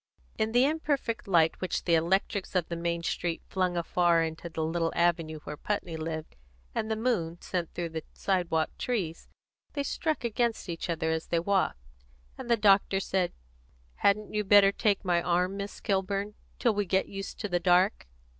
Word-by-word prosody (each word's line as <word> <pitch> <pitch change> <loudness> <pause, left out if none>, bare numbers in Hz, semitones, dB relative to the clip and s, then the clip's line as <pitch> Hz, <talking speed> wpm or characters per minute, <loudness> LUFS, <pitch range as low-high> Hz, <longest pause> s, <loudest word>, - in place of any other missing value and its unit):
In 220 0 +1
the 245 +3 +5
imperfect 285 -7 -1
light 165 -4 +3
which 185 - -2
the 170 - +1
electrics 190 +4 +1
of 180 -3 +1
the 170 - -2
main 170 0 -2
street 170 0 -2
flung 185 -2 -1
afar 170 0 +3
into 160 +1 -5
the 160 -1 -3
little 165 +1 0
avenue 165 -3 +1
where 150 - -6
Putney 180 -1 -3
lived, 160 0 -5 0.4
and 220 - -2
the 220 - +1
moon 205 -8 -1
sent 175 -3 -3
through 170 -1 -2
the 160 0 -4
sidewalk 175 -5 0
trees, 185 -10 -2 0.5
they 285 - -1
struck 310 +1 -1
against 235 -3 -1
each 170 +1 -4
other 160 -1 0
as 160 0 -2
they 170 - +1
walked, 190 - +1 0.6
and 255 -2 -8
the 235 - +4
doctor 200 -2 +4
said, 185 -2 0 0.7
"Hadn't 210 +1 +2
you 210 0 +1
better 200 0 +7
take 205 -1 +1
my 175 -1 +2
arm, 180 +2 +1
Miss 200 0 -6
Kilburn, 200 +1 -1 0.2
till 235 - +2
we 205 0 0
get 190 +2 +1
used 195 0 -7
to - - -1
the 175 -3 0
dark?" 180 - +3
185 Hz, 180 wpm, -29 LUFS, 170-205 Hz, 0.7 s, better